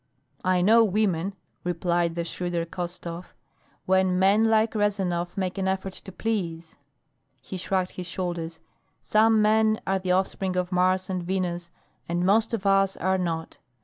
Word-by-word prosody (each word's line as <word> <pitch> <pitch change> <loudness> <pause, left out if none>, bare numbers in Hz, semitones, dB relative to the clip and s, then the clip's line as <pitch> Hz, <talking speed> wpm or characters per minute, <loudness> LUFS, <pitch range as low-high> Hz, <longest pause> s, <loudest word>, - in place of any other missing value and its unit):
"I 185 -1 +2
know 225 +4 +6
women," 195 -3 0 0.3
replied 175 -1 0
the 170 - -1
shrewder 175 0 -2
Khostov. 175 0 -6 0.5
"When 190 -1 +3
men 200 +4 +4
like 220 0 +3
Rezanov 190 -5 -1
make 190 0 -2
an 190 - 0
effort 190 0 -2
to 190 - -8
please 170 -6 -3 0.3
" - - -47 0.3
He - - -7
shrugged 185 0 -1
his 180 -1 -7
shoulders. 170 -2 -4 0.4
"Some 220 0 +4
men 220 0 +3
are 195 0 +1
the 185 -1 0
offspring 190 0 0
of 180 0 -1
Mars 185 +1 +2
and 185 -1 -2
Venus 175 -1 -2 0.4
and 175 +1 0
most 220 +4 +3
of 220 -4 -3
us 195 -1 +3
are 190 0 +1
not. 165 -2 -3
185 Hz, 155 wpm, -26 LUFS, 175-195 Hz, 0.5 s, know